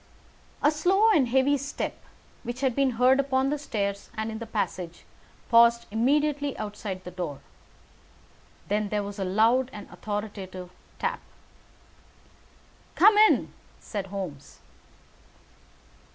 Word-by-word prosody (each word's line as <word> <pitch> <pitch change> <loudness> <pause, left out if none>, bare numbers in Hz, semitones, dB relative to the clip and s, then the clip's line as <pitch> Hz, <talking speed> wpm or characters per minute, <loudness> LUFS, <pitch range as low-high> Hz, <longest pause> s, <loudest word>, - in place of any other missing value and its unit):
A 295 - +5
slow 385 +8 +3
and 290 - +4
heavy 265 +3 +2
step, 280 +2 -4 0.5
which 240 +1 -6
had 260 -3 +1
been 275 -2 +2
heard 255 +2 +5
upon 270 0 +1
the 295 - -1
stairs 200 -7 -3
and 220 +1 -2
in 220 - -6
the 230 - -7
passage, 175 -5 -4 0.5
paused 235 0 +6
immediately 285 +5 +1
outside 205 -3 -5
the 180 - -8
door. 175 -6 -5 1.3
Then 210 0 0
there 210 0 -1
was 200 0 -7
a - - 0
loud 225 +7 +3
and 210 - -9
authoritative 200 -4 -6 0.3
tap. - - -2 1.8
"Come 415 +4 +7
in!" 430 +1 +4 0.3
said 200 -3 -5
Holmes. 180 -8 -7
230 Hz, 125 wpm, -27 LUFS, 200-275 Hz, 1.8 s, Come